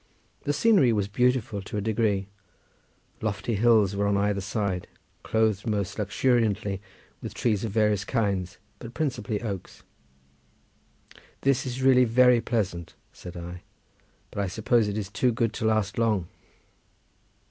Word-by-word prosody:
The 145 - +1
scenery 150 - +4
was 105 -3 0
beautiful 120 -1 0
to 95 - -6
a - - +1
degree, 105 -2 0 0.9
lofty 110 +2 -2
hills 105 -2 +4
were 100 0 +1
on 100 0 +2
either 100 0 0
side 95 -2 -2 0.3
clothed 110 -1 0
most 105 -2 -2
luxuriantly 105 -2 +1 0.4
with - - -7
trees 110 -3 0
of 110 - -2
various 105 -1 +2
kinds, 100 -6 -1 0.2
but 120 0 -10
principally 120 -8 -2
oaks. 100 -5 -6 1.6
"This 135 -1 +1
is 130 +1 -4
really 130 -1 +6
very 125 +1 +5
pleasant," 95 -9 -2 0.2
said 90 0 -10
I, 90 +1 -7 0.7
"but 100 - -3
I - - -1
suppose 110 +3 +1
it 105 0 -3
is 105 -3 -3
too 120 +5 +1
good 115 -1 0
to 110 - -3
last 110 -1 +1
long." 105 -7 +1
105 Hz, 140 wpm, -26 LUFS, 100-120 Hz, 1.6 s, really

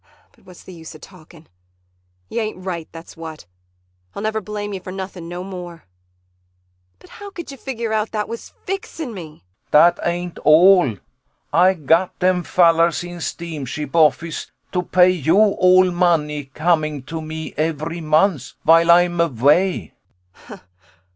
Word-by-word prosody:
] - - -34
But - - -28
what's 180 -1 -14
the 185 - -12
use 160 -2 -11
of 155 - -14
talking. 165 -3 -16 0.8
You 230 - -3
ain't 215 -4 -5
right, 170 -4 -4
that's 165 0 -12
what. 160 - -9 0.7
I'll 200 - -5
never 215 0 -1
blame 205 0 -5
you 190 - -4
for 185 - -9
nothing 185 -3 -7
no 175 +1 -6
more. 180 -3 -9 1.1
But - - -19
how 410 - -11
you 385 -4 -7
could 275 -2 -11
figure 235 -4 -4
out 215 0 0
that 210 -1 -2
was 230 - -9
fixing 330 -8 -5
me! 160 - -10 0.3
CHRIS - - -42
Dat 170 +3 +5
ain't 175 0 -3
all. 160 - +5 0.6
Ay 185 +2 +4
gat 165 +3 +1
dem 180 0 +1
fallars 170 -1 +3
in 175 -1 -9
steam 165 -3 -5
ship 145 +3 -6
office 165 0 +2 0.2
to 180 - 0
pay 180 0 +4
you 170 0 +1
all 185 -3 +4
money 160 -5 0
coming 155 0 -1
to 160 +4 -6
me 160 0 -7
every 160 +2 -3
month 155 -2 +1
vhile 165 +1 +5
Ay'm 175 0 +4
avay. 145 - +1
175 Hz, 155 wpm, -20 LUFS, 160-185 Hz, 1.1 s, Dat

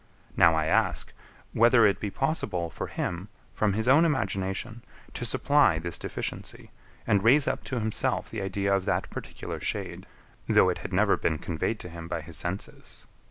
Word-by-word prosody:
Now 85 -1 +5
I 80 -1 +1
ask, 80 - +1 0.4
whether 115 0 +5
it 100 - +2
be 105 - -3
possible 95 - -1
for - - -5
him, 90 +3 -4 0.3
from 105 -2 +1
his 110 +3 -1
own 140 +6 +6
imagination, 110 - -1 0.3
to 120 - -4
supply 140 - +3
this 85 +1 -3
deficiency, - - -6 0.3
and 100 -1 +2
raise 135 +5 +5
up - - -1
to 130 - -3
himself 110 +4 -1
the 110 - -5
idea 100 +1 -1
of 95 -1 -2
that 105 - -1
particular - - -7
shade, - - -4 0.4
though - - +5
it - - -2
had - - -7
never - - +3
been 80 - 0
conveyed 85 +8 -2
to 90 - -8
him 85 0 -8
by 85 -1 -3
his 80 +1 -8
senses? 85 +7 -5
100 Hz, 175 wpm, -27 LUFS, 85-120 Hz, 0.4 s, own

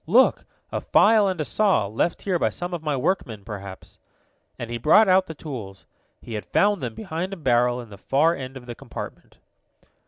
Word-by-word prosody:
"Look, 240 +10 +4 0.3
a - - -2
file 215 -1 +5
and 185 -3 -2
a 155 - -1
saw, 200 - +2
left 110 - -1
here 185 -3 0
by - - +2
some 175 0 -5
of 170 - -3
my 150 -3 -1
workmen, 125 - -1
perhaps," 100 -2 -9 0.6
and 120 0 -6
he 120 - -3
brought 195 - +6
out 185 0 +4
the 160 - -7
tools. 115 -12 -8 0.4
He 115 - -8
had 105 - -3
found 205 -2 +2
them 120 -4 -4
behind 185 -1 -4
a - - -6
barrel 125 -4 +2
in 115 -3 -10
the 100 - -11
far 155 +9 +2
end 130 -2 -7
of 125 - -12
the 120 - -6
compartment. - - -9
150 Hz, 205 wpm, -24 LUFS, 120-185 Hz, 0.6 s, brought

